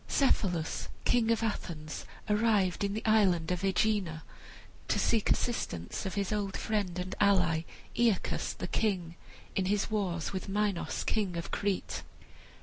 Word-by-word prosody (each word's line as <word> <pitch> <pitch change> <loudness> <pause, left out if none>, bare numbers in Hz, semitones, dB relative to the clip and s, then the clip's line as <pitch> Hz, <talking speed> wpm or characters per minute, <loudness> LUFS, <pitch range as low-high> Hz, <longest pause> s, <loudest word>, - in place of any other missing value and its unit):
Cephalus, 180 - +1 0.2
king 235 -2 +3
of 230 0 +2
Athens, 160 -8 -3 0.2
arrived 210 -4 +2
in 200 0 0
the 220 - -4
island 190 -7 +4
of 180 +1 -1
Aegina 190 -4 +1 0.6
to - - +1
seek 225 -3 +2
assistance 90 - -1
of 190 - -4
his 200 0 0
old 200 -2 -1
friend 200 -5 -1
and 180 +1 -3
ally 180 -5 +3 0.3
Aeacus, 230 -5 +1
the - - -5
king, 180 -6 0 0.4
in 190 - +1
his 205 +3 +1
war 190 -5 0
with 190 +1 -4
Minos, 205 -2 0
king 195 -5 0
of 170 - -5
Crete. 200 -2 -1
195 Hz, 145 wpm, -31 LUFS, 180-215 Hz, 0.6 s, island